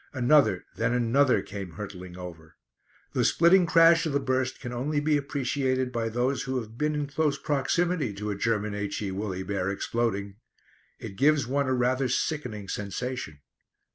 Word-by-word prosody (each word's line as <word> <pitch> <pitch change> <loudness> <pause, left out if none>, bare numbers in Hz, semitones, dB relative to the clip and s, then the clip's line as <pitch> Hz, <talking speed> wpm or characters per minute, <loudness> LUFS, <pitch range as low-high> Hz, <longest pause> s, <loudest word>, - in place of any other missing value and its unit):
Another 130 -7 +3
then 115 +2 +1
another 125 +3 +3
came 100 -4 -7
hurtling 90 -1 -8
over. 80 -3 -10 0.6
The - - +1
splitting 175 +2 +5
crash 165 0 +5
of 150 - -3
the 140 - +2
burst 130 -1 -1
can 125 -2 -6
only 145 +5 -1
be 150 +1 +2
appreciated 135 -2 -1
by 115 -2 -1
those 125 +4 0
who 130 -1 -2
have 110 -1 -9
been 150 +4 0
in 150 -1 -1
close 145 0 0
proximity 150 - 0
to 105 +1 -4
a - - -2
German 105 0 -1
H.E. 100 -1 -3
Woolly 95 -1 -3
Bear 95 -1 -2
exploding. 100 -1 -2 0.6
It 95 - -9
gives 145 0 +3
one 140 +3 0
rather 130 +1 +1
a - - -1
sickening 125 -7 -2
sensation. 100 - -5
125 Hz, 165 wpm, -27 LUFS, 100-140 Hz, 0.6 s, splitting